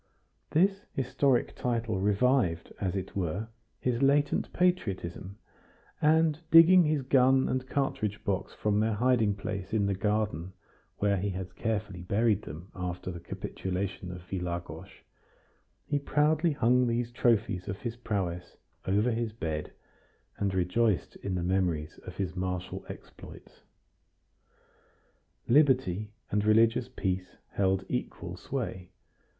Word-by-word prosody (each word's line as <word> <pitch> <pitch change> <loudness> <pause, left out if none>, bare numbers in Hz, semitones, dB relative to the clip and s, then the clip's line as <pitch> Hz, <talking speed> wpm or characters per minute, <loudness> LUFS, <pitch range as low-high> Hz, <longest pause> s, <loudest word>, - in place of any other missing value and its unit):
This 195 +5 +2
historic 135 -1 +1
title 115 -5 -1
revived, 105 -3 +1
as 95 -2 -1
it 95 -1 -4
were, 100 +4 -2 0.3
his 125 0 -1
latent 145 +1 +2
patriotism, 100 - -1 0.6
and, 160 0 +4
digging 170 +2 +8
his 150 -3 +1
gun 130 0 +4
and 130 0 -2
cartridge 110 -7 -1
box 100 -3 -1
from 105 -1 0
their 110 0 +1
hiding 115 -3 +2
place 100 -1 -5
in 105 -2 +2
the 100 - +1
garden 100 -3 -1 0.4
where 100 -1 +2
he 100 +2 -1
had 95 -1 -6
carefully 105 -5 -2
buried 105 +3 +2
them 85 +3 -9
after 90 0 -4
the 85 - -7
capitulation 95 +1 -4
of 90 -1 -8
Vilagos, 90 -2 -4 1.0
he 145 - 0
proudly 150 +3 +2
hung 125 -1 +3
these 120 0 -1
trophies 110 -6 +1
of 95 - -3
his 115 -2 -4
prowess 95 -7 -3 0.3
over 105 +6 +2
his 115 -1 -1
bed, 80 -8 -4 0.7
and 100 -2 -1
rejoiced 95 +1 +1
in 95 -2 -3
the 90 - -1
memories 85 -4 -1
of - - -8
his 95 -2 -2
martial 90 -1 -3
exploits. - - -12 1.9
Liberty 120 - +3 0.2
and 105 0 +1
religious 115 +3 +4
peace 95 -1 -3
held 95 -1 +1
equal - - -4
sway. 90 -1 -5
105 Hz, 125 wpm, -29 LUFS, 95-125 Hz, 1.9 s, digging